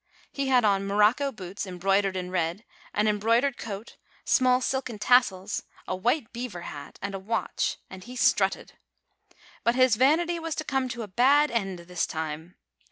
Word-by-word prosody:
He 275 -1 -2
had 250 -3 +4
on 195 -1 +2
morocco 210 +8 +3
boots 195 -2 -7
embroidered 195 +1 +1
in 180 0 -4
red, 175 +3 -2 0.3
an 210 - +1
embroid 220 +3 +2
ered 280 -3 0
coat, 215 0 -7 0.3
small 255 -1 +4
silken 260 -3 -2
tassels, 210 -4 +2 0.3
a - - -1
white 235 +6 0
beaver 235 -7 -5
hat, 145 -4 -9
and 200 0 -3
a 195 - -4
watch; 220 +4 -2
and 185 -1 -10
he 250 +1 -10
strutted. 250 - +1 0.9
But 235 +1 +2
his 255 -3 +4
vanity 335 +7 +3
was 325 -2 -4
to 310 - -3
come 265 -3 -1
to 235 -1 -5
a - - -7
bad 275 +9 +4
end 195 -6 -1
this 175 0 -2
time. 160 +2 -5
215 Hz, 170 wpm, -27 LUFS, 190-255 Hz, 0.9 s, had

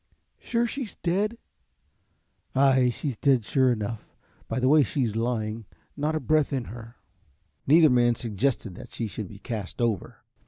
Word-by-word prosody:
"Sure 235 0 0
she's 240 -3 -5
dead?" 205 +6 0 1.2
"Ay, 130 -2 +4
she's 130 +1 -3
dead 130 -4 +2
sure 130 +1 +3
enough 110 -1 -4 0.3
by - - -2
the 130 - +2
way 150 +2 +6
she's 125 -6 -1
lying, 115 -1 -2 0.3
not 150 +2 -1
a - - 0
breath 155 -2 +2
in 135 -3 -1
her." 115 +1 -10 0.7
Neither 155 0 +6
man 120 -1 +4
suggested 115 -1 -1
that - - -11
she 115 - -3
should 105 -1 -5
be 100 - -11
cast 105 -1 -6
over. 115 -6 -2
125 Hz, 155 wpm, -26 LUFS, 115-150 Hz, 1.2 s, way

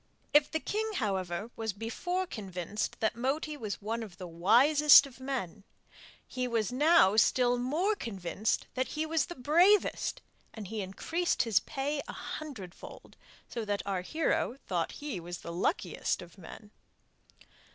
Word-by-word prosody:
If 295 0 +5
the 315 - -1
king, 435 +5 -2
however, 195 - -2
was 220 -2 -3
before 355 - -3
convinced 195 - -4
that 220 +1 +1
Moti 285 +6 -1
was 215 -7 -5
one 225 +2 -2
of 200 -6 -9
the 185 - -7
wisest 265 - +6
of 265 -2 -13
men, 245 -8 -4 0.6
he 255 -1 -2
was 230 -2 0
now 290 - +5
still 245 +4 +4
more 325 - +1
convinced 205 - -2
that 260 0 -1
he 310 +1 -2
was 320 -2 0
the 345 - -7
bravest, 345 +10 +3 0.3
and 220 -3 -7
he 220 -2 -3
increased 325 - -1
his 225 -4 +3
pay 285 0 -3
a - - -6
hundredfold, 225 - -8 0.3
so 230 - -4
that 205 -1 -2
our 195 -2 -1
hero 270 - -1
thought - - -1
that - - -10
he 255 -11 -3
was 175 +1 -7
the 170 - -7
luckiest 185 - -1
of 175 - -15
men. 205 +3 -12
235 Hz, 155 wpm, -31 LUFS, 200-300 Hz, 0.6 s, wisest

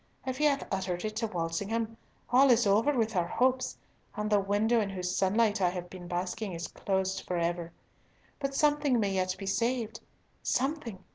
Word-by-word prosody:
If 260 0 -3
he 300 - +3
hath 280 -1 +2
uttered 185 -1 -2
it 215 0 -3
to 225 0 0
Walsingham, 200 +6 -2 0.4
all 265 +2 +6
is 240 -2 +5
over 210 +8 +4
with 225 -2 +1
our 175 -2 +2
hopes, 255 +6 +1 0.4
and 210 0 -2
the 205 - +5
window 210 +4 +2
in 205 - -1
whose 180 -2 -3
sunlight 205 +2 +2
I 180 - +4
have 175 -1 -6
been 180 -2 -9
basking 180 +3 -3
is 170 0 -4
closed 190 -1 -1
for 180 - -1
ever! 170 0 -1 0.7
But 275 -1 -2
something 290 -4 +3
may 200 -2 +1
yet 185 -1 0
be 195 - -6
saved. 230 +3 -1 0.4
Something? 250 - -1
205 Hz, 185 wpm, -30 LUFS, 185-240 Hz, 0.7 s, all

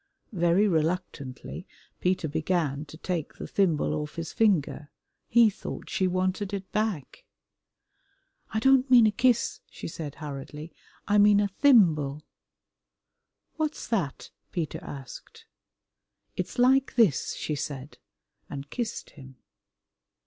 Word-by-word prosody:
Very 175 +3 +3
reluctantly 165 -2 -2 0.3
Peter 180 -3 0
began 155 -2 -1
to 155 +1 -12
take 170 -2 -3
the - - -7
thimble 170 -7 +1
off 150 0 -4
his 165 -1 -5
finger. 170 -8 +1 0.4
He 235 0 +6
thought - - -8
she 195 -4 +1
wanted 185 +2 -1
it 195 -1 -7
back. 210 -10 -2 1.3
"I - - -2
don't 265 +3 +4
mean 245 -3 +8
a 215 - +4
kiss," 235 +2 +2
she - - -8
said 155 -3 -6
hurriedly, 150 +2 -8 0.3
"I 210 0 +4
mean 205 0 +6
a 205 -1 +1
thimble." 165 - +4 1.3
"What's 310 -1 -2
that?" 180 - -2 0.2
Peter 165 -4 -3
asked. 145 - -10 0.9
"It's - - -4
like 265 +2 +3
this," 215 - +3
she 155 - -3
said, 140 -1 -6 0.5
and 140 +1 -7
kissed 235 -3 -4
him. 135 -3 -13
180 Hz, 120 wpm, -27 LUFS, 150-215 Hz, 1.3 s, mean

